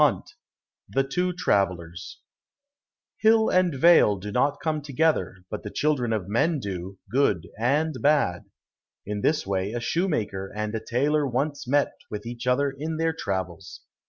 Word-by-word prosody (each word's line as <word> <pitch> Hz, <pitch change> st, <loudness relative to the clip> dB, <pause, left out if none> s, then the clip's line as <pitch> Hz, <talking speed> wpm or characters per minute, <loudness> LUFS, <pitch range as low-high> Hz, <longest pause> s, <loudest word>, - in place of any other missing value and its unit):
107 -, -, +1 dB, 0.5 s
The 135 Hz, +7 st, 0 dB
Two 180 Hz, +6 st, 0 dB
Travellers 90 Hz, -, -1 dB, 1.0 s
Hill 220 Hz, 0 st, +4 dB
and 185 Hz, -4 st, +2 dB
vale 135 Hz, -8 st, +6 dB
do 105 Hz, +2 st, -6 dB
not 140 Hz, +6 st, +1 dB
come 155 Hz, -2 st, -1 dB
together, 145 Hz, -, 0 dB
but -, -, -4 dB
the 105 Hz, -, -6 dB
children 130 Hz, -2 st, 0 dB
of 105 Hz, -5 st, -1 dB
men 145 Hz, +10 st, +1 dB
do, 95 Hz, -3 st, -6 dB
good 105 Hz, -, +2 dB
and 145 Hz, +6 st, +1 dB
bad. 145 Hz, -, +2 dB, 0.6 s
In 105 Hz, 0 st, -3 dB
this 155 Hz, +6 st, +1 dB
way 95 Hz, +2 st, -1 dB
a 120 Hz, -, -2 dB
shoemaker 115 Hz, -, -1 dB
and 105 Hz, 0 st, -3 dB
a 110 Hz, -1 st, -3 dB
tailor 145 Hz, +5 st, +1 dB
once 140 Hz, +2 st, -2 dB
met 145 Hz, +2 st, +2 dB, 0.2 s
with 105 Hz, 0 st, -6 dB
each 120 Hz, +1 st, -6 dB
other 140 Hz, +2 st, +2 dB
in 155 Hz, +3 st, -4 dB
their 165 Hz, 0 st, +1 dB
travels. 95 Hz, -, -4 dB
125 Hz, 155 wpm, -25 LUFS, 100-155 Hz, 1.0 s, vale